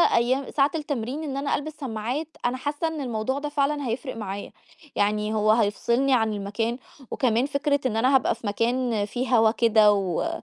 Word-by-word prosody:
أيام 255 +3 +1
ساعة 275 0 +2
التمرين 290 -1 -3
إن 275 -2 -4
أنا 280 +1 0
ألبس 310 +1 -5
سماعات، 250 +3 -3 0.2
أنا 250 +1 0
حاسّة 290 +4 -2
إن 320 -2 -4
الموضوع 245 +1 -2
ده 295 0 -4
فعلًا 285 -1 0
هيفرق 260 +4 -3
معايا. 200 -2 -5 0.4
يعني 210 +1 +1
هو 215 0 +3
هيفصلني 235 +5 +2
عن 220 -3 +2
المكان 210 +4 -2 0.3
وكمان 245 0 +1
فكرة 285 0 0
إن 225 -3 0
أنا 255 +4 +3
هابقى 265 - +2
في 220 - -8
مكان 230 0 0
فيه 245 +3 0
هوا 220 0 +5
كده، 220 -3 +5
و 195 - -1
245 Hz, 180 wpm, -25 LUFS, 220-280 Hz, 0.4 s, هوا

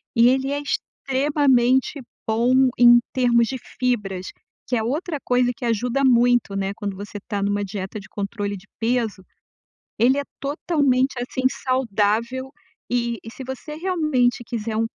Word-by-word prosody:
e 235 0 +6
ele 265 +1 +1
é 285 0 -1
extremamente 270 -2 +1 0.3
bom 245 +4 +3
em 240 0 +8
termos 240 -3 +3
de 265 - -3 0.2
fibras, 205 -7 -1 0.4
que 250 - 0
é 225 - 0
outra 300 +7 -2
coisa 245 0 +2
que - - -11
ajuda 240 +4 0
muito, 245 -4 +3
né, 195 0 -1
quando 200 -2 -4
você 205 +1 -7
tá 205 -4 -2
numa 205 +1 0
dieta 195 +1 -5
de 205 - -15
controle 205 0 -4
de 190 +3 -16
peso. 225 -4 0 0.8
Ele 255 +4 +4
é 285 - 0 0.2
totalmente, 280 -3 +1
assim, 255 +1 -4 0.2
saudável 235 0 0 0.4
e 235 -1 0
e 225 - -8
se 265 - -7
você 265 +4 -7
realmente 305 -9 +1
quiser 225 -1 -3
um 225 - +2
245 Hz, 150 wpm, -22 LUFS, 215-265 Hz, 0.8 s, em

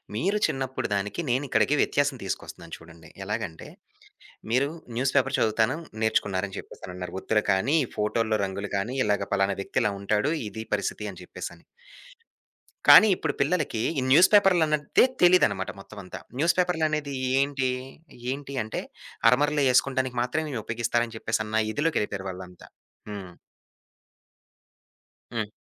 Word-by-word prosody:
మీరు 195 - +1
చిన్నప్పుడు 135 -1 -3
దానికి, 100 +10 -2
నేనిక్కడికి 135 +2 +2
వ్యత్యాసం 145 -2 +1
తీసుకొస్తున్నాను 85 -3 -6
చూడండి. 80 0 -15 0.2
ఎలాగంటే, 105 -5 -4 0.8
మీరు 130 +4 +3 0.3
న్యూస్‌ 130 +2 0
పేపర్ 135 0 +2
చదువుతాను 110 +5 +2 0.3
నేర్చుకున్నారని 100 -3 0
జెప్పేసనన్నారు. 90 -1 -8
ఒత్తులు 105 -1 +1
కానీ, 95 +11 +2
ఈ - - -12
ఫోటోల్లో 110 +1 +1
రంగులు 100 +1 -5
కానీ, 110 +7 -3
ఇలాగ 105 -1 0
పలానా 100 0 +1
వ్యక్తిలా 105 - 0
ఉంటాడు, 105 +8 +1 0.2
ఇదీ 110 +2 -7
పరిస్థితని 100 -2 -4
చెప్పేసని. - - -8 1.2
కానీ 220 - +10
ఇప్పుడు 160 -4 -2
పిల్లలకి 145 -6 0 0.2
ఈ - - -1
న్యూస్పేపర్‌లన్నదే 170 - +5 0.2
తెలీదనమాట 175 - +4
మొత్తం 100 - -11
అంతా. 90 - -8 0.2
న్యూసు 165 +3 +3
పేపరులనేది 155 -5 0 0.3
ఏంటి? 140 -2 0 0.6
ఏంటి 140 0 -6
అంటే 110 - -4 0.5
అరమరలు 145 +4 +2
ఏసుకోంటానికి 130 0 +1
మాత్రమే 150 +6 -1
ఇవి 115 - -3
ఉపయోగిస్తారని 120 0 -1
చెప్పేసి 110 0 -1
అన్న 110 +1 0
ఇధిలోకెళ్ళిపోయారాళ్ళంతా. 95 - -3 0.4
హ్మ్. 100 -3 -7 2.0
హ్మ్. 110 -3 -2
115 Hz, 115 wpm, -26 LUFS, 100-145 Hz, 2.0 s, కానీ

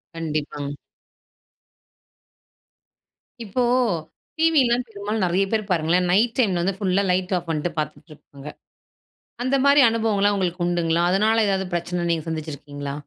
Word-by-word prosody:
கண்டிப்பாங்க. 150 -3 -4 2.7
இப்போ 225 +4 -1 0.8
டிவிலாம், 270 -7 +3
பெரும்பாலும் 210 0 -3
நெறைய 180 +2 +1
பேரு 220 -1 +1
பாருங்களேன், 175 +1 +2
நைட் 225 +5 +2
டைம்ல 195 -9 +2
வந்து 190 +2 -1
ஃபுல்லா 195 -1 +1
லைட் 180 +1 -1
ஆஃப் 175 -1 -6
பண்ணிட்டு 160 +2 -1
பார்த்துட்டு 155 +1 -5
இருப்பாங்க. 140 -1 -15 1.0
அந்த 260 +2 +1
மாரி 280 +1 +6
அனுபவங்கள்லாம் 210 -3 +1
உங்களுக்கு 180 -2 -2
உண்டுங்களா? 170 -1 +1
அதனால 220 +4 +3
ஏதாவது 190 -1 0
பிரச்சனை 175 0 -2
நீங்க 165 -2 -1
சந்திச்சிருக்கீங்களா? 145 -3 -6
180 Hz, 120 wpm, -23 LUFS, 165-215 Hz, 2.7 s, மாரி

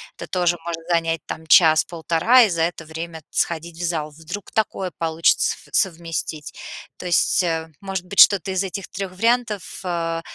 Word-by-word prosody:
это - - -8
тоже 175 -1 +1
может 170 -1 -4
занять 165 -2 +1
там 160 - -7
час-полтора, 165 +8 +5
и 220 - +2
за 170 -2 -1
это 165 -1 -2
время 160 0 -7
сходить 170 0 -2
в 175 - -5
зал. 155 -3 -2
Вдруг 165 +6 -8
такое 195 -4 -1
получится 165 0 +2
ф - - -18
совместить. 165 -4 -2 0.4
То - - -9
есть, 175 +1 +3
а, 165 -2 -2
может 190 -2 -4
быть, 195 +2 -4
что-то 195 -1 +5
из 190 +1 0
этих 195 0 -5
3 195 -1 -5
вариантов, 225 0 -1
а, 165 -2 -2
170 Hz, 170 wpm, -22 LUFS, 165-190 Hz, 0.4 s, час-полтора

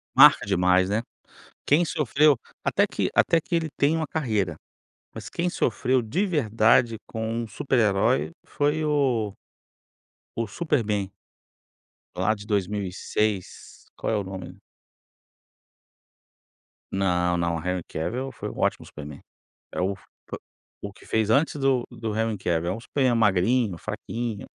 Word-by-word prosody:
Marca - - +8
demais, 90 +1 +3
né. 105 +3 +1 0.6
Quem 160 +5 +4
sofreu, 150 0 +3 0.3
até - - +3
que - - -1
até 165 - +4
que 170 +2 -3
ele 165 -1 0
tem 145 +3 +3
uma 160 -1 -1
carreira, 110 - -1 0.6
mas - - -7
quem 175 +1 -1
sofreu 125 -4 +1
de 165 - 0
verdade 115 - +3
com 110 -1 -4 0.2
um - - -5
super 130 +5 -1
herói 95 - +2
foi 150 +2 0
o 130 -8 +1 1.0
o 115 -1 -1
Superman, 105 - -1 1.0
lá 110 - +2
de 105 -2 -9
2006, 100 0 -2
qual - - -1
é - - +2
o 100 - -1
nome? 95 -1 -8 2.4
Não, 90 -2 +1
não, 85 -1 0
Henry 90 0 -1
Cavill 125 +12 -4
foi - - -6
um - - -9
ótimo - - 0
Superman, 75 -1 -10 0.5
é - - -3
o 95 +2 0 0.9
o 100 - -5
que - - -18
fez 110 -1 +1
antes 145 +6 +3
do 135 -3 +1
do 110 -2 -4
Henry 110 -1 0
Cavill, 85 0 -1
é - - -9
Superman 130 0 +1
magrinho, 105 0 +2
fraquinho. 115 +5 -5
110 Hz, 135 wpm, -25 LUFS, 95-135 Hz, 2.4 s, Marca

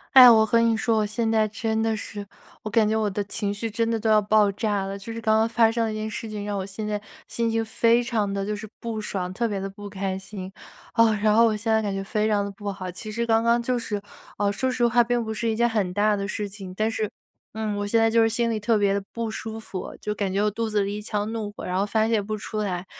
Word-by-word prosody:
哎， 250 -2 +12
我 220 -1 +6
和 230 +2 +3
你 230 -1 +3
说， 220 0 +1
我 215 - +2
现 220 +2 -1
在 220 -1 +3
真 220 +1 -2
的 225 0 +1
是 205 -1 -7 0.4
我 215 - -4
感 215 0 +3
觉 220 +1 +1
我 215 -1 +1
的 205 +1 -2
情 200 0 -3
绪 220 +2 -4
真 230 +1 0
的 230 - +1
都 220 0 -1
要 215 -1 +5
爆 210 0 +3
炸 205 -1 -1
了， 195 +1 -4
就 225 +3 -7
是 230 - -6
刚 220 -1 +3
刚 225 - +3
发 230 -1 +3
生 230 0 0
的 220 - -2
一 - - -4
件 215 0 -3
事 220 +1 -5
情， 210 -1 -5
让 205 -1 -2
我 190 - -3
现 200 +2 -6
在 210 -1 -2 0.3
心 230 -1 0
情 225 0 0
非 230 +2 +3
常 220 -5 -1
地 195 0 -2
就 210 - -2
是 210 +1 -6
不 230 -2 -3
爽， 185 -4 -3
特 235 +4 0
别 205 -3 -2
地 195 0 -3
不 205 +1 -9
开 190 -1 -3
心， 190 -1 -8 0.4
哦， 230 -1 +5
然 215 -1 +4
后 230 +2 +6
我 220 -2 +2
现 225 +2 -2
在 220 0 +4
感 205 -2 -2
觉 195 - -3
非 210 +2 0
常 205 -2 +2
地 200 - -4
不 205 +1 -6
好。 190 -2 -5
其 215 +5 -8
实 235 +2 -2
刚 225 -1 +3
刚 235 +1 +2
就 250 0 0
是， 210 -3 -3 0.4
呃， 205 -1 +1
说 260 +6 -1
实 250 -1 +1
话 240 +1 +4
并 240 0 +1
不 220 0 -4
是 220 +2 -2
一 220 - 0
件 235 +1 +2
很 205 -5 -1
大 210 +2 +3
的 200 0 -3
事 210 -1 -3
情， 195 -2 -9
但 215 +3 0
是， 215 -2 -2 0.4
嗯， 215 -1 -2
我 205 0 -2
现 230 - +2
在 225 0 +4
就 230 0 +4
是 225 - +5
心 230 +1 0
里 220 - -1
特 220 +2 +2
别 200 -1 +2
地 200 - 0
不 230 -1 -3
舒 220 0 -6
服， 195 -4 -7
就 210 - -2
感 200 -2 -2
觉 200 +2 +1
我 210 - +2
肚 225 +2 -2
子 210 -1 +1
里 200 +1 -3
一 - - -6
腔 210 0 -2
怒 220 -2 -3
火 - - -8
然 180 +1 -1
后 200 - +2
发 220 +1 +1
泄 225 -2 +2
不 215 +2 -3
出 215 +1 -6
来。 190 -4 -2
215 Hz, 320 characters per minute, -25 LUFS, 205-225 Hz, 0.4 s, 哎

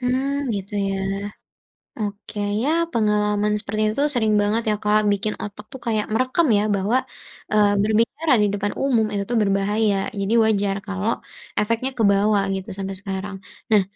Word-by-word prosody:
Hmm, 255 +2 0 0.2
gitu, 200 0 -5 0.2
ya. 195 - -1 1.0
Oke, 210 0 -5 0.2
ya, 270 - +1 0.2
pengalaman 210 -1 +1
seperti 215 0 -3
itu 220 +6 -1
sering 220 -4 +2
banget, 210 +3 +1
ya, 210 - +2
Kak, 210 +1 +4
bikin 210 +1 -1
otak 210 0 -8
itu 265 - -7
kaya 220 -2 +1
merekam 255 +8 +2 0.3
bahwa, 205 +6 +1 0.6
eee, 210 -1 +5
berbicara 230 +9 +2
di 210 - +4
depan 205 0 -2
umum 240 -5 +3
itu 200 -1 -1
tuh 240 - +1
berbahaya. 205 +1 +1 0.2
Jadi 200 +3 0
wajar 205 -2 +1
kalau 200 +3 -1 0.5
efeknya 230 +5 0
kebawa, 205 -1 +3 0.2
gitu, 190 -1 -6
sampai 195 0 -4
sekarang. 195 0 -5 0.4
Nah, 210 -2 +6
210 Hz, 150 wpm, -22 LUFS, 200-225 Hz, 1.0 s, Nah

